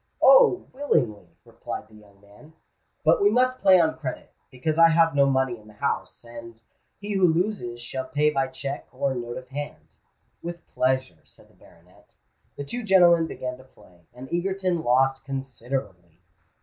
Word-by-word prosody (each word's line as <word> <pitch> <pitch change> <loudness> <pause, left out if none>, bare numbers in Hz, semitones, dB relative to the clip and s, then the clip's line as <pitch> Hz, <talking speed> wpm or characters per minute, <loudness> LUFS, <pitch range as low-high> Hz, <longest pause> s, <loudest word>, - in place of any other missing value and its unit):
"Oh! - - +6
willingly," 125 - -1 0.2
replied - - -8
the 110 - -23
young 105 -2 -19
man. 105 +10 -19 0.5
"But - - +4
we 405 - +5
must 255 -2 +1
play 190 -2 +6
on 160 -1 +1
credit, 130 -5 -6 0.2
because 155 +5 -3
I 165 0 +8
have 165 0 +3
no 140 -1 +4
money 130 -3 0
in 105 - -19
the 105 - -16
house; 110 - -3
and 115 -1 -11 0.4
he 205 0 -5
who 190 -2 +4
loses 160 - -2
shall 130 +2 -5
pay 150 +2 +1
by 135 -2 0
cheque 135 +2 -6
or 135 +1 -1
note 120 -1 -5
of 130 -1 -10
hand." 145 +2 -8 0.5
"With 170 0 -7
pleasure," 130 -10 0
said - - -22
the - - -26
baronet. - - -23 0.4
The 145 - -6
two 240 +13 -5
gentlemen 175 -6 +5
began 125 -4 -6
to - - -14
play; 90 -9 -23
and 125 +2 -11
Egerton 185 -1 -1
lost 135 +1 +2
considerably. 125 - -6
135 Hz, 170 wpm, -25 LUFS, 120-170 Hz, 0.5 s, I